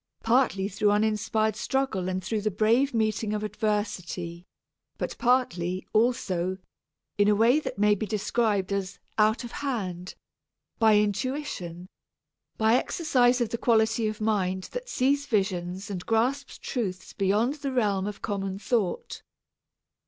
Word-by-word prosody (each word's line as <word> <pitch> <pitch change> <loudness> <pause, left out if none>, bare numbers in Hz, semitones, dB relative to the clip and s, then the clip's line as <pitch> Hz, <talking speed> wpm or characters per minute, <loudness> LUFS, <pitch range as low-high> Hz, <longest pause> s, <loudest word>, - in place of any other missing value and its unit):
Partly 225 -5 +2
through 205 +1 +1
uninspired 215 +1 +1
struggle 225 -6 -1
and 185 0 -2
through 210 +3 -1
the 215 - 0
brave 225 +7 +2
meeting 215 -1 0
of 210 - -3
adversity, 205 -5 -3 0.5
but - - -3
partly, 185 -8 +1
also, 190 -6 +1 0.6
in 205 - +5
a 210 - +5
way 235 +7 +4
that 310 - -5
may 210 +1 +4
be 210 +1 -2
described 210 -2 0
as 195 -1 -3 0.2
"out 215 +3 +3
of 240 - -7
hand," 190 -10 -4 0.6
by 220 -2 +6
intuition, 210 - -2 0.7
by 220 0 +3
exercise 250 -6 +2
of 235 - +1
the 235 - -3
quality 220 -1 +2
of 215 0 -4
mind 190 -4 0
that - - -6
sees 280 - +1
visions 190 -1 -1
and 180 -3 -5
grasps 250 +5 0
truths 185 -7 -4
beyond 210 +6 +1
the 275 - -2
realms 205 -6 +1
of 210 -1 -7
common 195 -2 -2
thought. 225 - -2
215 Hz, 135 wpm, -27 LUFS, 190-235 Hz, 0.7 s, by